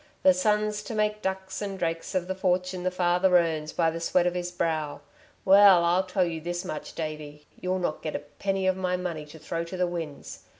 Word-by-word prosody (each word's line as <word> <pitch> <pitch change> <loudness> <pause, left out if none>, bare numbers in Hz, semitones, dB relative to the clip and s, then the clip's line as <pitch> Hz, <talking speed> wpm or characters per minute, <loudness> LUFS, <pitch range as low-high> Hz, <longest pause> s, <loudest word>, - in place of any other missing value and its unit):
"The 280 - +7
son's 210 -5 +1
to 230 - -5
make 210 0 0
ducks 190 0 -3
and 200 -2 -4
drakes 165 0 -3
of 180 -1 0
the 190 - -1
fortune 185 -1 0
the 185 - +1
father 180 0 +3
earns 160 -3 0
by 165 -1 +1
the 165 - -5
sweat 175 +1 +2
of 180 - +1
his 180 0 -3
brow. 155 -4 -2 0.4
Well, 195 -2 +8
I'll 180 +2 +2
tell 185 0 +1
you 165 -2 -4
this 175 +2 -4
much, 155 -4 -6
Davey, 150 -2 -6
you'll 185 +1 -1
not 175 -4 -2
get 155 - -4
a - - -1
penny 190 +7 -3
of 185 0 +3
my 180 -1 -1
money 170 -4 -4
to 150 - -12
throw 165 +2 -4
to 185 +2 -7
the 180 - +2
winds. 165 -5 -6
180 Hz, 220 wpm, -27 LUFS, 165-190 Hz, 0.4 s, Well